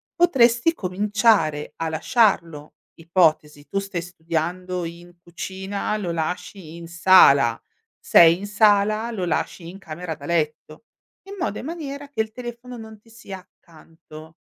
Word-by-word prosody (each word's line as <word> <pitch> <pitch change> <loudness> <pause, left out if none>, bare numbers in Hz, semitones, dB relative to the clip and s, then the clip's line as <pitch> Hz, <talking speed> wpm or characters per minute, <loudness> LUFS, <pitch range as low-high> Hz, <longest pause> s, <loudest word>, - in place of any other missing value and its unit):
potresti 270 -4 +3
cominciare 200 - 0
a 165 0 -3
lasciarlo. 165 -3 0 0.2
Ipotesi: 160 -4 0
tu 195 - -2
stai 195 -3 -5
studiando 175 +1 -4
in 175 +1 -11
cucina, 190 +4 -5
lo 180 -5 -4
lasci 165 +1 -5
in 170 -1 -10
sala, 165 -9 +5 0.4
sei 170 0 +6
in 200 +2 -7
sala, 215 +2 +2
lo 190 -5 -3
lasci 170 0 -3
in 185 - -10
camera 165 -1 -7
da 145 -1 -12
letto, 155 +2 -3 0.4
in 400 - -8
modo 275 - -2
e - - -6
in - - -10
maniera 285 -4 -7
che 255 - -11
il 220 0 -5
telefono 240 +1 -9
non 220 -2 -11
ti 225 - -25
sia 220 -4 -10
accanto. 160 -2 -17
180 Hz, 145 wpm, -22 LUFS, 165-215 Hz, 0.4 s, sei